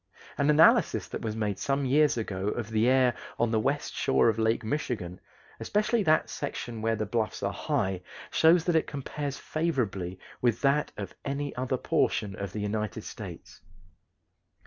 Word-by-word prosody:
An 140 +1 +1
analysis 150 +2 +5
that - - -5
was 110 -1 -3
made 105 -3 -2
some 140 0 0
years 145 +1 +3
ago 100 -3 -3
of 115 +1 -3
the 110 +1 +2
air 130 -1 +4 0.2
on 120 -1 +1
the 110 - +2
west 140 +6 -1
shore 65 - +3
of 110 0 -1
Lake 110 +1 +1
Michigan, 110 - -3 0.4
especially 215 +2 +1
that 155 -5 +3
section 115 -2 -5
where 115 0 +1
the 110 0 -2
bluffs 110 +1 -2
are - - 0
high, 95 -1 -1 0.3
shows 165 +1 +5
that 175 -1 +1
it 160 - +2
compares 140 0 -4
favorably 115 - -2 0.2
with 120 -3 +1
that 145 +1 +2
of - - -6
any 140 +1 -3
other 130 +1 -1
portion 100 -4 0
of 100 -1 -5
the 105 - -4
United 105 -2 -2
States. - - -9
120 Hz, 170 wpm, -28 LUFS, 105-145 Hz, 0.4 s, analysis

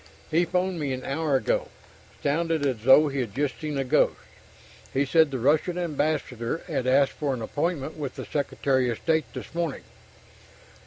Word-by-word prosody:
"He 170 +3 +3
phoned 180 +1 -1
me 140 -3 -1
an 130 0 -5
hour 145 +1 0
ago. 130 -5 +1 0.6
Sounded 160 +1 +1
as 130 -6 -1
though 145 +3 +7
he'd 125 -7 -3
just 140 -3 -1
seen 150 -2 -3
a 135 - +1
ghost. 125 - +2 0.7
He 135 +2 +1
said 160 +2 +4
the 135 - -3
Russian 150 +8 +2
ambassador 150 -5 -2
had 135 -7 -2
asked 135 +1 +4
for 140 -3 -2
an 120 - -7
appointment 155 +3 -2
with 140 -4 -5
the - - -6
Secretary 135 -3 0
of 115 - -2
State 160 -1 0
this - - -7
morning...." 165 -4 -2
145 Hz, 170 wpm, -26 LUFS, 130-160 Hz, 0.7 s, though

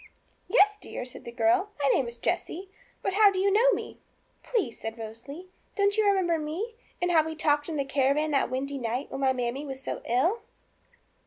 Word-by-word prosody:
'Yes, 420 -3 +4
dear,' - - -5
said 250 - -7
the 235 - -6
girl, 360 - +2
'my 280 -1 +2
name 260 -1 +2
is 235 0 -7
Jessie; 360 +6 -3 0.3
but 390 - 0
how 415 +1 +7
do 390 - -3
you 390 +1 +3
know 455 +5 +5
me?' - - -4 0.4
'Please,' 405 - -2
said 225 +1 -5
Rosalie, 235 +10 -8 0.3
'don't 405 0 +3
you 435 -1 +3
remember 365 -5 +2
me? 335 +10 -4 0.3
And 355 0 +1
how 320 -2 +5
we 320 0 -5
talked 295 0 +1
in 320 - -3
the 280 -2 0
caravan 280 +3 +1
that 275 - +2
windy 275 +2 -3
night, 245 +3 -3
when 270 - -4
my 265 -1 +4
mammie 250 +2 -2
was 270 -2 -6
so 270 - -5
ill?' 330 - +1
305 Hz, 200 wpm, -28 LUFS, 265-385 Hz, 0.4 s, how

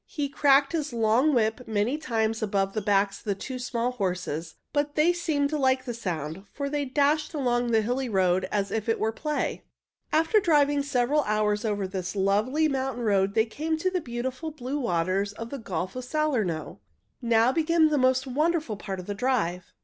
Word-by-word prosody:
He 290 -3 -3
cracked 275 0 +4
his 305 -5 -2
long 230 +6 +3
whip 230 -1 0
many 220 +4 0
times 225 -6 -1
above 195 -2 0
the 215 - -1
backs 200 0 +1
of - - -22
the 200 -2 0
two 255 +6 -6
small 245 0 -1
horses, 180 -7 -3 0.2
but 290 0 0
they 320 +3 +4
seemed 310 -5 0
to 305 - -1
like 260 -1 +2
the 240 - -3
sound, 175 -5 -4
for 280 -1 -4
they 290 -1 -1
dashed 295 +4 +1
along 245 -4 +1
over 235 - -2
the 220 - +4
hilly 250 +3 -1
road 185 -2 +1
as 200 -1 -1
if 220 0 -2
it 225 - +1
were 220 - +1
play. 300 +6 -3 0.5
After 325 +7 +4
driving 290 -5 +3
several 280 +1 +1
hours 210 0 +1
over 205 -2 -1
this 185 0 -4
lovely 210 +11 +2
mountain 265 -3 -2
road 200 -2 +2
they 220 - +4
came 315 +7 -2
to 370 +4 0
the 365 -1 -1
beautiful 255 +4 -4
blue 285 -1 -4
waters 195 -2 0
of 230 +2 -8
the 280 - -5
Gulf 185 -2 -4
of 255 - -4
Salerno. 245 - -1 0.4
Now 235 0 +3
began 320 +1 +3
the 295 -2 +1
most 260 0 +3
wonderful 300 -3 0
part 195 -2 -5
of 180 - -7
the 205 - -3
drive. 200 -6 -1
245 Hz, 195 wpm, -26 LUFS, 205-290 Hz, 0.5 s, cracked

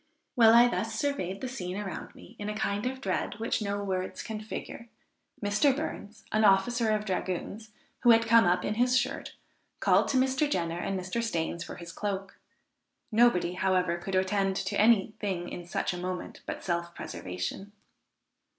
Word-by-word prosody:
While 230 -2 +7
I 240 +1 +8
thus 225 -2 -2
surveyed 220 -8 -2
the 260 - -2
scene 185 -7 -5
around 200 -4 -6
me - - -14
in 205 0 -3
a 210 - -3
kind 205 +1 -1
of 260 +1 -4
dread 190 +1 -1
which 225 0 -1
no 200 -1 -2
words 185 -1 -3
can 220 -2 -5
figure, 230 +2 -7 0.5
Mr. 215 +7 +3
Burns, 225 -7 -6
an 215 0 +2
officer 220 +4 +4
of 215 0 +1
dragoons, 195 +3 -3 0.3
who 240 - +3
had 230 0 +6
come 230 -1 +6
up 175 +1 +2
in 210 - 0
his 250 +3 +3
shirt, - - -2 0.4
called - - +4
to 265 - +1
Mr. 265 +3 +2
Jenner 170 -7 -1
and 190 +1 -2
Mr. 185 +6 -2
Stains 170 -6 -2
for - - -8
his 170 -1 -9
cloak; 195 +1 -4 0.7
nobody, 215 -6 +4
however, 180 -2 +1
could 190 +2 -4
attend 190 +1 +1
to 195 +1 0
any 215 -2 +4
thing 185 -4 -2
in 175 -1 -7
such 175 - -1
a - - -5
moment 180 0 -5
but - - -5
self 170 -1 -2
preservation. 90 - -5
205 Hz, 180 wpm, -29 LUFS, 185-230 Hz, 0.7 s, I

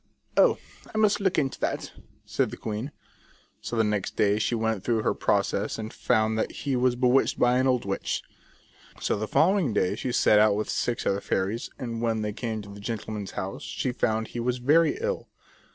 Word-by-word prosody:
" - - -39
Oh, - - +2 0.3
I - - -5
must 215 -1 +3
look 190 -2 +1
into 135 -3 0
that," - - -2 0.3
said - - 0
the - - -8
queen. 110 +6 -4 0.7
So - - -4
the 115 - +3
next 105 -2 -1
day 105 0 +3
she 120 - 0
went 110 -3 -1
through 115 -3 +1
her - - +2
process - - 0
and 110 0 -6
found 110 0 +1
that - - -1
he 140 -2 0
was 125 0 +2
bewitched 125 +1 +3
by 125 +1 +3
an 130 - +2
old 125 -4 +1
witch. 100 0 -2 0.8
So - - 0
the 110 +1 -3
following 165 - +3
day 90 - +2
she 125 - -3
set 105 -3 +5
out 105 -1 +5
with 105 - -2
six 120 -1 -1
other 100 +1 +1
fairies, 100 +5 -1
and 115 -2 -4
when 115 -2 0
they 105 0 -2
came 110 -1 -4
to 100 0 -10
the 100 - -10
gentleman's 105 -1 -5
house 95 +1 -4
she 130 - -2
found 110 -2 -1
he 120 - -5
was 125 +1 0
very 155 - +3
ill. 480 +1 -2
115 Hz, 205 wpm, -27 LUFS, 105-125 Hz, 0.8 s, set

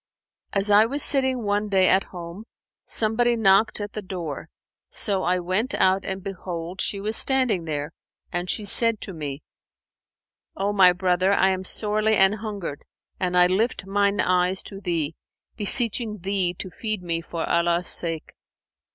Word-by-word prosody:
As 200 +1 +2
I 210 +2 +6
was 280 +4 +2
sitting 260 -3 +2
one 205 0 -1
day 190 -2 +4
at 190 - +3
home, 175 +4 -9 0.4
somebody 235 +2 +1
knocked 215 -1 +3
at 205 0 -6
the 215 - -5
door; 175 -7 -6 0.4
so 195 -2 -1
I 180 0 +1
went 185 +7 -1
out 190 +1 +2
and 190 -1 -4
behold, 180 -2 -6
she 200 - -2
was 215 +2 0
standing 255 -11 +3
there; 150 -2 -4 0.4
and 175 +1 -3
she 215 - -1
said 230 +2 +4
to 195 - -6
me, 145 -3 -6 1.1
'O 200 +1 -1
my 190 -3 +6
brother, 180 +1 +1
I 190 -1 +3
am 190 0 -2
sorely 215 +2 0
an 195 0 +5
hungered 205 -9 -6 0.4
and 180 -1 0
I 180 - +7
lift 200 +3 0
mine 200 +1 0
eyes 180 +1 +1
to 195 -1 -10
thee, 165 -5 -2 0.4
beseeching 225 0 +1
thee 190 -2 -1
to 185 - -7
feed 215 -3 -4
me 165 -1 -2
for 165 0 -5
Allah's 170 +1 +1
sake!' 165 -2 -1
195 Hz, 160 wpm, -23 LUFS, 180-215 Hz, 1.1 s, I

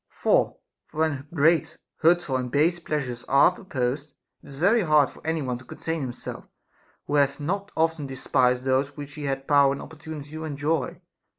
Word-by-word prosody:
For - - +1 0.3
when 155 -3 -1
great, 160 0 +2 0.2
hurtful, 165 -4 +3
and 125 -1 -1
base 165 +5 +2
pleasures 135 -7 -3
are 140 +6 +5
proposed, 140 -5 -3 0.3
it - - -15
is 140 - -10
very 200 +9 +4
hard 150 -6 +4
for - - -15
any 160 -1 -1
one 125 -2 -3
to - - -14
contain 160 +5 -4
himself, 125 -2 -6 0.6
who - - -5
hath 140 -1 +2
not 195 +7 -3
often 160 -3 +1
despised 125 -1 +1
those 135 +2 0
which 145 -1 -7
he 150 -1 -6
had 135 0 -3
power 140 -1 +5
and 140 - -6
opportunity 155 -2 -9
to 155 +1 -6
enjoy. 150 +1 -2
145 Hz, 175 wpm, -25 LUFS, 135-160 Hz, 0.6 s, are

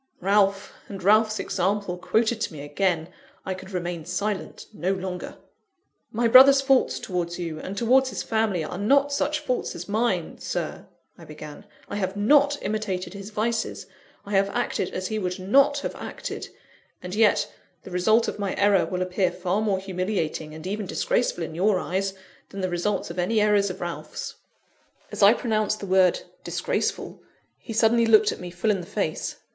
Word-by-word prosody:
Ralph, 200 +1 +2
and 195 -2 -8
Ralph's 215 +2 +4
example 195 0 -1
quoted 220 +5 0
to 185 - -2
me 145 - -8
again! 160 +2 0 0.4
I 190 - -2
could 190 0 -10
remain 175 -3 -4
silent 190 +4 -3
no 190 -1 -1
longer. 185 -1 -5 0.7
"My 235 +2 +1
brother's 270 +3 +8
faults 270 -1 +2
towards 175 -2 -3
you, 165 -3 -4
and 195 +5 -6
towards 260 +4 +4
his - - -4
family, 220 -6 0
are 175 +4 -5
not 280 +7 +3
such 300 +2 0
faults 255 -4 -2
as 175 - -7
mine, 205 -5 -1
Sir," - - -4 0.3
I - - -12
began. 155 +4 -10 0.2
"I 205 - -4
have 190 -1 -2
not 285 +7 +4
imitated 195 -4 -3
his 200 0 -8
vices; 225 +2 -2 0.4
I 200 - -8
have 195 0 +3
acted 245 - -1
as 185 0 -4
he 215 -1 -2
would 180 -1 -2
not 275 +10 +3
have - - -3
acted. - - -6 0.5
And 180 0 -6
yet, 215 0 +3 0.3
the 190 - -10
result 215 +6 +3
of - - -4
my 200 -2 -2
error 200 -1 +3
will 185 -1 -1
appear 185 0 +1
far 185 +3 -1
more 205 -3 +1
humiliating, 185 -5 -3
and 160 +1 -10
even 205 +1 -3
disgraceful, - - 0
in - - -6
your 190 +4 +2
eyes, 190 +2 -2 0.3
than 195 - -6
the 185 - -1
results 180 +2 -1
of 175 - -6
any 215 +5 +1
errors 210 -1 +3
of 185 - -7
Ralph's." 175 -1 -5 0.8
As - - -5
I 205 +3 +8
pronounced 215 -3 0
the - - -6
word 185 -2 +3 0.2
"disgraceful," - - -2 0.4
he - - -9
suddenly 230 +1 +3
looked 220 -1 +5
me 180 - -6
full 180 +5 0
in 195 -3 -1
the 175 - -11
face. 195 -6 -2
200 Hz, 175 wpm, -25 LUFS, 180-220 Hz, 0.8 s, brother's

